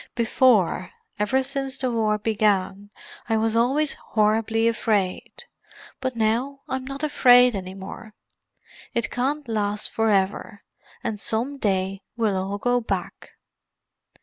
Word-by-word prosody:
Before—ever 230 Hz, 0 st, +1 dB
since 270 Hz, 0 st, -3 dB
the 255 Hz, -2 st, 0 dB
war 215 Hz, -2 st, +1 dB
began—I 205 Hz, +1 st, -1 dB
was 225 Hz, 0 st, 0 dB
always 275 Hz, +6 st, +2 dB
horribly 225 Hz, +1 st, +1 dB
afraid, 210 Hz, -5 st, -1 dB, 0.6 s
but 260 Hz, -2 st, -3 dB
now 235 Hz, +5 st, 0 dB
I'm 260 Hz, 0 st, -3 dB
not 275 Hz, +2 st, -6 dB
afraid 250 Hz, -5 st, +5 dB
any 185 Hz, -1 st, -6 dB
more. 210 Hz, +3 st, -10 dB, 0.8 s
It 235 Hz, -, -1 dB
can't 280 Hz, +3 st, -2 dB
last 210 Hz, -2 st, -1 dB
for 225 Hz, 0 st, +1 dB
ever; 200 Hz, 0 st, -1 dB, 0.4 s
and 210 Hz, -2 st, -3 dB
some 245 Hz, +8 st, -2 dB
day 195 Hz, -2 st, -1 dB, 0.2 s
we'll 220 Hz, -4 st, +1 dB
all 190 Hz, +2 st, -2 dB
go 245 Hz, +4 st, +1 dB
back." 225 Hz, -, -5 dB
225 Hz, 120 wpm, -24 LUFS, 205-255 Hz, 0.8 s, afraid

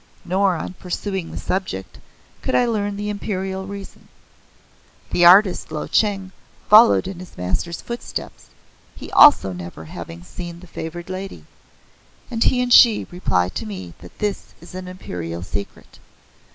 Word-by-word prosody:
Nor, 190 Hz, 0 st, +2 dB
on 165 Hz, -, -5 dB
pursuing 190 Hz, 0 st, -4 dB
the -, -, -7 dB
subject, 185 Hz, -, -4 dB, 0.4 s
could -, -, -1 dB
I 250 Hz, -, +4 dB
learn 205 Hz, -3 st, -1 dB
the 210 Hz, 0 st, -3 dB
Imperial 190 Hz, -2 st, -4 dB
reason. 200 Hz, 0 st, -9 dB, 1.0 s
The 175 Hz, -, +4 dB
artist 185 Hz, -1 st, +6 dB
Lo 155 Hz, -1 st, -3 dB
Cheng 195 Hz, -3 st, 0 dB, 0.4 s
follows 220 Hz, -1 st, +7 dB
in 185 Hz, -2 st, -6 dB
his 185 Hz, -1 st, -12 dB
Master's 95 Hz, -, -2 dB
footsteps, 235 Hz, 0 st, -7 dB, 0.5 s
he -, -, -10 dB
also 285 Hz, -, +7 dB
never 85 Hz, -2 st, -8 dB
having 85 Hz, +2 st, -9 dB
seen 170 Hz, -, -8 dB
the 180 Hz, -, -13 dB
favored 170 Hz, 0 st, -7 dB
lady, 190 Hz, +1 st, -7 dB, 0.9 s
and 230 Hz, -1 st, +1 dB
he 250 Hz, -1 st, +3 dB
and 245 Hz, -1 st, +2 dB
she 230 Hz, -4 st, +7 dB
reply 90 Hz, -, 0 dB
to 105 Hz, -, -5 dB
me 95 Hz, -4 st, -7 dB
that 90 Hz, -, -14 dB
this 205 Hz, -2 st, -3 dB
is 170 Hz, -, -14 dB
an 185 Hz, 0 st, -7 dB
Imperial 85 Hz, -, -6 dB
secret. 100 Hz, +2 st, -7 dB
185 Hz, 150 wpm, -21 LUFS, -, 1.0 s, follows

